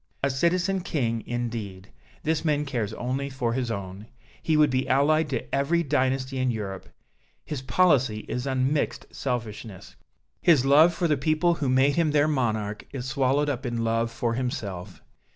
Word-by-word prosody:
A 140 - +2
Citizen 180 +7 +1
King, 120 -10 -1
indeed! 115 -6 -4 0.3
This 160 0 0
man 150 -2 +1
cares 120 -7 -2
only 130 +4 -3
for 125 -4 -2
his 125 -1 -1
own. 100 0 -6 0.3
He 160 -1 +1
would 150 -2 +4
be 130 +1 0
allied 150 +4 +3
to 130 -4 -4
every 155 +5 +2
dynasty 130 -2 0
in 130 0 +1
Europe. 100 -5 -5 0.6
His 150 -4 -4
policy 130 -5 +2
is 125 +2 -3
unmixed 135 +2 0
selfishness. 110 -6 -5 0.5
His 150 -7 +4
love 150 +5 +6
for 170 +1 -1
the 150 -2 +2
people 155 +5 +2
who 145 -5 -2
made 135 +3 +3
him 165 -2 +3
their 150 0 +4
monarch 110 -7 -1
is 130 -3 -5
swallowed 135 +1 +1
up 135 -3 -2
in 120 -3 -2
love 115 0 +1
for 115 0 -2
himself. 100 -7 -4
130 Hz, 165 wpm, -26 LUFS, 115-150 Hz, 0.6 s, love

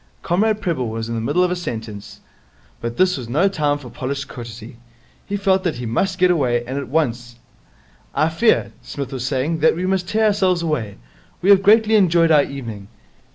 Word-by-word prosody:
Comrade 210 +4 +1
Prebble 155 - -1
was 115 0 -4
in - - -3
the 115 - -2
middle 145 +10 +1
of 180 - +1
a - - 0
sentence, 110 - -7 0.6
but 115 0 -4
this 185 -2 +3
was 120 -3 -7
no 160 +10 +3
time 150 -6 0
for 130 -5 -11
polished 140 0 -4
courtesy. 115 -1 -9 0.5
He 200 - -2
felt 190 -1 +1
that 170 -5 -1
he 120 0 -6
must 180 +12 -1
get 180 0 +4
away, 125 -7 +1
and 130 +3 -3
at 140 - -6
once. 120 -5 -1 0.8
'I 155 +3 +2
fear,' 220 +8 +2
Psmith 140 -2 -6
was 125 -1 -3
saying, 145 +5 -1
'that 160 +1 +4
we 180 +2 -2
must 185 -1 0
tear 220 +1 +2
ourselves 190 -4 +2
away. 130 -11 -2 0.5
We 195 - +5
have 195 -1 +6
greatly 220 +2 +4
enjoyed 170 -4 +4
our 150 -2 +6
evening. 115 -8 -6
150 Hz, 200 wpm, -20 LUFS, 120-185 Hz, 0.8 s, have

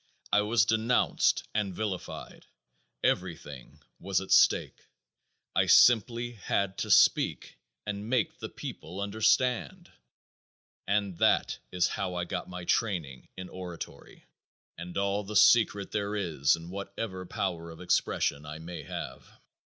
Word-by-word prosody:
I 105 - +5
was 110 +2 +3
denounced 115 +3 +2
and 100 -4 -1
vilified. 100 -3 -5 0.6
Everything 80 -7 -3 0.2
was 95 -1 0
at 95 - -8
stake. - - +3 0.7
I - - +3
simply 120 +1 +5
had 100 -3 -2
to - - -3
speak - - +3 0.3
and 105 +1 -5
make 125 -4 0
the - - -6
people 90 +4 -8
understand, 115 - 0 1.0
and 100 -3 0
that - - +2
is 90 -1 +2
how 95 -4 -3
I 90 - -1
got 90 0 -5
my 90 -1 -7
training 85 - -1
in 95 0 -6
oratory, 90 -3 -9 0.5
and 85 +1 -7
all 100 +1 0
the 105 +2 -7
secret 105 -4 +4
there 105 0 -2
is 80 -8 +1
in 85 +1 -10
whatever 100 0 -5
power 85 -3 -3
of 80 - -11
expression 75 -4 0
I 75 0 -7
may 85 +2 -8
have. - - -8
100 Hz, 130 wpm, -29 LUFS, 90-105 Hz, 1.0 s, I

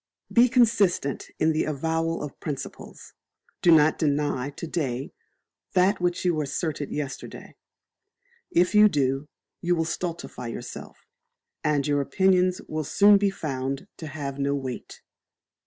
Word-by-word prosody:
Be 245 +1 +6
consistent 210 - +2
in 160 - +3
the 155 - 0
avowal 160 +2 -1
of 150 - -8
Principles. 145 -4 -7 0.5
Do - - +3
not 155 -1 +5
deny 145 -3 0
to 145 - -7
day 135 -6 -3 0.6
that 185 +1 +3
which 175 0 0
you 170 -4 +2
asserted 150 0 -3
yesterday. 145 -2 -6 0.9
If 180 +4 +2
you 210 0 +7
do, 135 -2 0 0.3
you 175 0 +1
will 165 -1 0
stultify 170 -7 -4
yourself, 115 - -8 0.6
and 145 -2 +1
your 145 -1 +1
opinions 185 +3 +2
will 155 0 -3
soon 200 +7 +5
be 200 0 +2
found 135 -3 -4
to 160 - -7
have 140 -2 -5
no 140 0 +1
weight. 130 -3 -6
155 Hz, 135 wpm, -26 LUFS, 140-180 Hz, 0.9 s, you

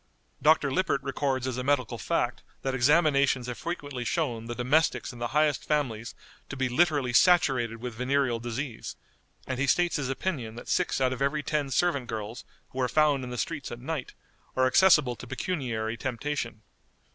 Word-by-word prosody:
Dr. 150 -2 +4
Lippert 155 -5 0
records 135 -1 -1
as 130 -1 -2
a - - -2
medical 130 -4 0
fact - - -1 0.2
that 135 - -1
examinations 140 -1 +3
have 125 -1 -5
frequently 145 -6 -4
shown 120 -6 -1
the 120 - -4
domestics 135 +4 +1
in 120 - -11
the 120 - -1
highest 150 +2 +1
families 120 -7 -1 0.3
to 140 - -6
be 130 0 +1
literally 140 -2 +2
saturated 130 -8 +4
with 125 -2 -4
venereal 125 0 0
disease, 120 +1 -5 0.5
and 130 -1 -3
he 140 - +1
states 175 +5 +2
his 135 -3 -2
opinion 135 -6 -3
that 120 - -9
six 180 - +1
out 130 -1 +2
of 130 - -7
every 145 +2 0
ten 150 -2 -1
servant 140 -4 +1
girls 110 +2 -5 0.3
who 130 - -3
are 125 - +1
found 150 -3 +3
in 125 - -6
the 125 - -5
streets 150 +2 -3
at 120 - -6
night 140 +1 -5 0.4
are 130 - +3
accessible 135 -2 +5
to 125 - -10
pecuniary 120 -9 -3
temptation. 120 -3 -3
130 Hz, 180 wpm, -28 LUFS, 120-150 Hz, 0.5 s, accessible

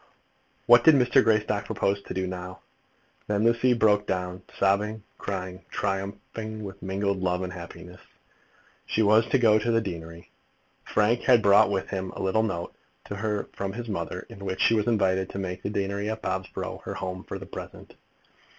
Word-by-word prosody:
What 120 0 +7
did 160 - +8
Mr. 125 -2 +4
Greystock 105 -2 +1
propose 100 +1 0
to - - -4
do 95 0 0
now? 90 0 -6 0.7
Then 105 0 +1
Lucy 115 +2 +4
broke 105 -3 +3
down, 90 0 -2 0.2
sobbing, 105 +2 +1 0.2
crying, 95 -1 -5
triumphing, 100 +2 -4
with 100 0 -8
mingled 100 0 -1
love 90 0 0
and 90 0 -5
happiness. 90 0 -10 0.9
She 110 - +1
was 110 +2 +5
to - - +3
go 110 -3 +5
to 115 - -2
the 115 -1 +4
deanery. 85 -4 -7 0.5
Frank 115 +3 +2
had 120 -4 +5
brought 100 0 +6
with 95 -2 -1
him 95 -1 -3
a - - -4
little 95 +3 +2
note 90 -6 -3 0.3
to 100 - -5
her 105 0 -2
from 95 -1 -4
his 120 +2 -6
mother, 85 -6 -4
in 100 - -11
which 95 -1 -3
she - - +5
was 110 -1 +1
invited 95 -4 +2
to - - -7
make 90 -1 -4
the - - -3
deanery 100 0 -2
at 110 0 -4
Bobsborough 95 0 -4
her - - -5
home 90 0 -5
for - - -6
the - - -9
present. - - -9
100 Hz, 180 wpm, -26 LUFS, 95-110 Hz, 0.9 s, did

